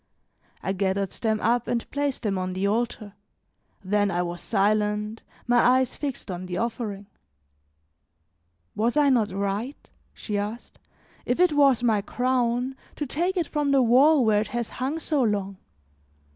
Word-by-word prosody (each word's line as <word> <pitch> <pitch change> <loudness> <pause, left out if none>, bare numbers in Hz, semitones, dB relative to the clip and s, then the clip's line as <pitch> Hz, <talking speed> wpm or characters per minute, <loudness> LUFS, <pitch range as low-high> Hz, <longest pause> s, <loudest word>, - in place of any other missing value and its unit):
I 190 - -1
gathered 195 0 -1
them 220 -2 -1
up 240 +1 +1
and 235 -1 -1
placed 285 -2 -2
them 205 -3 0
on 185 0 -3
the 190 +2 -1
altar, 215 -1 -1 0.7
then 205 +1 +1
I 175 -1 0
was 175 0 -5
silent, 210 +1 0 0.2
my 245 0 +3
eyes 255 +1 +3
fixed 275 -8 -5
on 180 0 -6
the 180 - -4
offering. 220 -4 -3 1.7
"Was 230 +5 0
I 290 -1 +5
not 230 -5 +2
right," 200 +7 -4 0.2
she 210 -2 -3
asked, 210 +4 -6 0.5
"if 245 - 0
it 360 -3 +4
was 275 -4 +4
my 220 -4 +2
crown, 250 +2 0 0.2
to 295 - -3
take 350 +8 -1
it 345 - +1
from 295 -1 -1
the 275 -2 +4
wall 260 +4 +5
where 210 -1 +3
it 215 - -3
has 235 0 -3
hung 275 +5 -1
so 305 -3 0
long? 200 -4 -1
230 Hz, 160 wpm, -25 LUFS, 205-260 Hz, 1.7 s, I